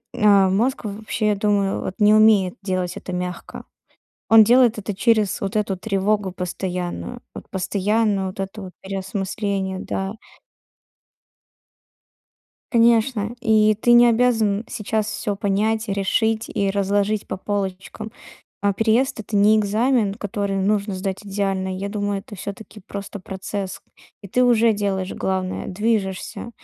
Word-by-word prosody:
а 200 -2 +5
мозг 230 +6 0
в 200 -1 -4
вообще, 215 0 -2
я 210 - +2
думаю, 200 -1 0
вот 185 - -5
не 210 0 +6
умеет 215 -3 +5
делать 185 -2 -2
это - - -7
мягко. 180 0 -5 0.6
Он 225 -1 +8
делает 240 0 +4
это 205 0 -4
через 215 0 +2
вот 195 +1 -2
эту 205 -2 0
тревогу 200 0 0
постоянную. 180 +5 -4
Вот - - -10
постоянно 200 +1 0
вот 185 +1 -7
это 195 +2 -5
вот 185 -1 -9
переосмысление, 195 0 -3
да. 195 0 -3 2.6
Конечно, 230 -1 +3
и 215 -2 +4
ты 240 - +4
не 240 0 +8
обязан 225 -3 +2
сейчас 215 -2 -2
всё 215 -1 -3
понять, 215 +3 0
решить 220 +3 0
и 200 -1 0
разложить 200 +1 0
по - - -4
полочкам. 200 +2 -4 0.5
А 200 0 +3
переезд- 225 +5 +1
это 210 0 -3
не 210 +2 +5
экзамен, 215 +1 +1
который 200 -2 -3
нужно 200 +1 0
сдать 190 +2 -4
идеально. 195 -1 -2
Я 195 +2 -4
думаю, 205 -1 -2
это 210 - -12
всё-таки 205 +2 -8
просто 200 +1 -7
процесс. 190 0 -5 0.4
И 200 - -9
ты 250 +7 +2
уже 235 -2 +4
делаешь 195 -3 -2
главное- 185 -1 -2
движешься, 205 +1 -2
205 Hz, 135 wpm, -22 LUFS, 195-220 Hz, 2.6 s, Он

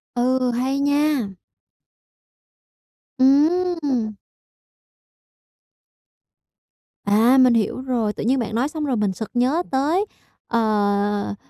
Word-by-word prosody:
Ừ, 255 +1 +1
hay 260 +3 -1
nha! 285 -3 +1 1.9
Ừm! 290 -4 +2 2.9
À, 225 +6 +4
mình 255 -2 +5
hiểu 230 +3 -1
rồi. 235 -5 -2
Tự - - -6
nhiên 260 +4 +1
bạn 225 -2 -4
nói 245 +4 +1
xong 305 -1 -4
rồi 260 -3 -1
mình 210 -3 -1
sực 220 +3 -7
nhớ 260 +8 +1
tới, 305 +9 +1 0.4
ờ, 205 -2 0
255 Hz, 100 wpm, -21 LUFS, 220-280 Hz, 2.9 s, mình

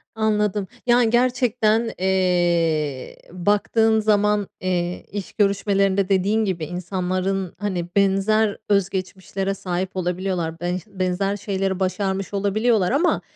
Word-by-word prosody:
Anladım. 210 -2 0 0.2
Yani, 240 -1 +4
gerçekten, 235 -2 +2
eee, 175 -6 +1
baktığın 210 +4 +2
zaman, 210 -1 +2
eee, 180 -1 -2
iş 205 -2 -6
görüşmelerinde 200 -2 +1
dediğin 200 +3 +2
gibi 175 -5 -2
insanların, 185 +2 -2
hani, 185 -4 -2
benzer 200 +2 +2
öz 200 -2 +3
geçmişlere 190 0 -3
sahip 185 0 -4
olabiliyorlar. 180 -2 -2
Benş 175 +1 -2
benzer 195 0 -1
şeyleri 195 -1 -2
başarmış 190 +1 -2
olabiliyorlar 205 +1 +1
ama 305 +7 +2
195 Hz, 110 wpm, -22 LUFS, 185-210 Hz, 0.2 s, Yani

